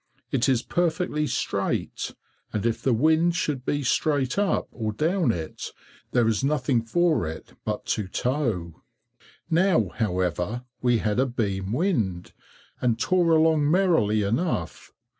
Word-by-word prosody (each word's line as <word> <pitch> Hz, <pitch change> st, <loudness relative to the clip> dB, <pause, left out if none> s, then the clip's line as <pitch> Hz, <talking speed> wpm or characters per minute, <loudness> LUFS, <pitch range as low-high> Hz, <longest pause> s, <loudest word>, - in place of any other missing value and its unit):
It 135 Hz, 0 st, +2 dB
is 125 Hz, -3 st, +2 dB
perfectly 160 Hz, -3 st, 0 dB
straight, -, -, -2 dB, 0.4 s
and 105 Hz, 0 st, -2 dB
if 115 Hz, -1 st, 0 dB
the 130 Hz, -, +1 dB
wind 160 Hz, +8 st, +3 dB
should 150 Hz, -6 st, -1 dB
be 145 Hz, +2 st, -1 dB
straight 140 Hz, +3 st, +1 dB
up 205 Hz, -1 st, +1 dB
or 110 Hz, -2 st, -3 dB
down 165 Hz, -, +1 dB
it, 80 Hz, -6 st, -5 dB, 0.4 s
there 120 Hz, -2 st, +3 dB
is 115 Hz, +2 st, +1 dB
nothing 135 Hz, -4 st, +1 dB
for 155 Hz, -, +1 dB
it 80 Hz, 0 st, -8 dB
but 105 Hz, -1 st, -3 dB
to 105 Hz, -3 st, -3 dB
tow. 105 Hz, -, -2 dB, 0.7 s
Now, 165 Hz, -, +3 dB
however, 90 Hz, +2 st, -1 dB, 0.2 s
we 120 Hz, -1 st, +3 dB
had 110 Hz, +1 st, 0 dB
a 135 Hz, -, +3 dB
beam 100 Hz, -6 st, -2 dB
wind, 115 Hz, -, -1 dB, 0.5 s
and 120 Hz, -3 st, +2 dB
tore 175 Hz, +4 st, +2 dB
along 160 Hz, -2 st, +4 dB
merrily 160 Hz, -, +3 dB
enough. 110 Hz, -, -2 dB
125 Hz, 140 wpm, -25 LUFS, 105-160 Hz, 0.7 s, along